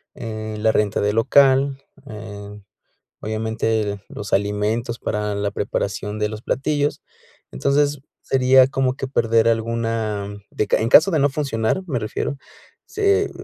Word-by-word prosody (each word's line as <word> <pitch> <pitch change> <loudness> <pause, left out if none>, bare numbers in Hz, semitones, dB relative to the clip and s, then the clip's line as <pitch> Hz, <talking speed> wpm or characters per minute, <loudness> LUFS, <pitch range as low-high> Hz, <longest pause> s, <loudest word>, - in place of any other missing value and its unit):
eh, 110 -1 -6
la 110 +1 +3
renta 105 -2 0
del 105 +2 0
local, 135 +2 +3 0.3
eh, 105 -1 -9 0.6
obviamente, 110 -1 -2
los 105 - -8
alimentos 105 +4 -1
para 105 -1 -2
la 100 0 -1
preparación 105 +1 -3
de 105 - +1
los 110 0 -7
platillos. 145 +3 -1 0.5
Entonces, 145 - +1 0.2
sería 130 0 +5
como 130 -1 0
que 135 0 -5
perder 115 -3 +2
alguna, 115 -2 -1 0.2
de 105 - -1
ca - - +3
en 110 - 0
caso 160 +10 +7
de 160 - +1
no 145 +1 +3
funcionar, 135 +1 -1
me 130 -6 -1
refiero, 115 +6 -3 0.5
se 410 -1 +1
115 Hz, 140 wpm, -21 LUFS, 105-135 Hz, 0.6 s, caso